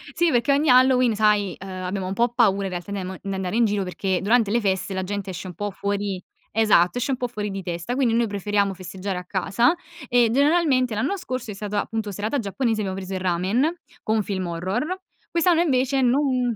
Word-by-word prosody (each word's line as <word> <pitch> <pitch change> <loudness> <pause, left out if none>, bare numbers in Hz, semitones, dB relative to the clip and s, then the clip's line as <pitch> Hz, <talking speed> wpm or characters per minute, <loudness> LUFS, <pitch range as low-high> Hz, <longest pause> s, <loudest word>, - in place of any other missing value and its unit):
Sì 340 -2 +3
perché 240 +3 +2
ogni 290 +1 +2
Halloween, 255 -2 +5
sai, 210 -3 +2
uhm 195 +1 -8
abbiamo 185 0 -4
un 190 - -2
po' 235 +3 +2
paura 210 -5 +2
in - - -2
realtà 180 +3 -6
di 200 - -2
amo 185 0 -5
di 195 -1 -4
andare 190 +1 -3
in 235 - +4
giro 205 -1 0
perché 185 0 -2
durante 220 0 +3
le 235 - +2
feste 190 -1 -1
la 190 0 -2
gente 200 0 -4
esce 180 +1 -6
un 180 - -7
po' 205 +3 -3
fuori 200 -1 -2 0.3
esatto 210 -3 +3
esce 245 +3 -1
un 255 - 0
po' 245 - -2
fuori 210 -3 -4
di 195 - -4
testa 175 +5 -4
quindi 250 -4 +2
noi 235 0 +3
preferiamo 200 0 0
festeggiare 185 +1 -5
a 180 - -6
casa 200 - +2 0.3
e 240 -2 +4
generalmente 280 -3 +3
l'anno 280 - -1
scorso 255 - -5
è - - -5
stata 205 0 -2
appunto 220 -2 -4
serata 215 +8 -2
giapponese 225 +1 -1
abbiamo 190 -1 -3
preso 195 0 -6
il - - -2
ramen 185 - +1 0.3
con 220 - 0
un 210 - +1
film 190 -2 -3
horror 190 - -2 0.3
quest'anno 340 0 +3
invece 270 -4 +2
non 250 -2 +2
210 Hz, 220 wpm, -23 LUFS, 190-245 Hz, 0.3 s, Halloween